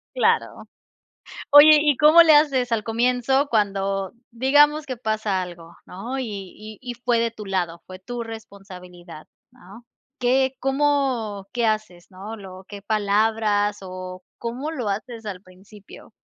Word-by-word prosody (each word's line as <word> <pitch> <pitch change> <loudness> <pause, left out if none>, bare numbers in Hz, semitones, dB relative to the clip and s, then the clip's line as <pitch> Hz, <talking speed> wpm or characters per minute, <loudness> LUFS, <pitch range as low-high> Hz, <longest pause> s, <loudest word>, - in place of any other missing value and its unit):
Claro. - - 0 0.9
Oye, 300 +1 +8
y, 295 -3 +2
¿cómo 310 +3 +8
le 315 -2 +6
haces 270 -5 +2
al 225 -2 +1
comienzo 250 +5 +1
cuando? 195 -3 -1 0.2
Digamos 290 +5 +3
que 255 -2 -5
pasa 215 -4 -2
algo, 170 -1 -11
¿no? 235 +9 -6
Y 260 - -2 0.3
y 215 -1 -11
y 245 -1 -6
fue 240 -1 0
de 230 0 0
tu 215 -2 -10
lado. 175 -4 -3
Fue 185 0 -10
tu 240 +5 -6
responsabilidad, 185 -7 -11 0.2
¿no? 235 -1 -16 0.3
¿Qué 260 +1 +1
cómo 270 -7 -1
qué 240 -2 0
haces, 215 -5 -3
no? 200 +4 -9
Lo 190 -2 -11
¿Qué 205 -1 -9
palabras 210 0 0
o 185 0 -8 0.2
cómo 250 +6 -5
lo 250 -9 -4
haces 225 +2 -5
al 190 -2 -6
principio? 195 +2 -16
220 Hz, 145 wpm, -22 LUFS, 195-255 Hz, 0.9 s, Oye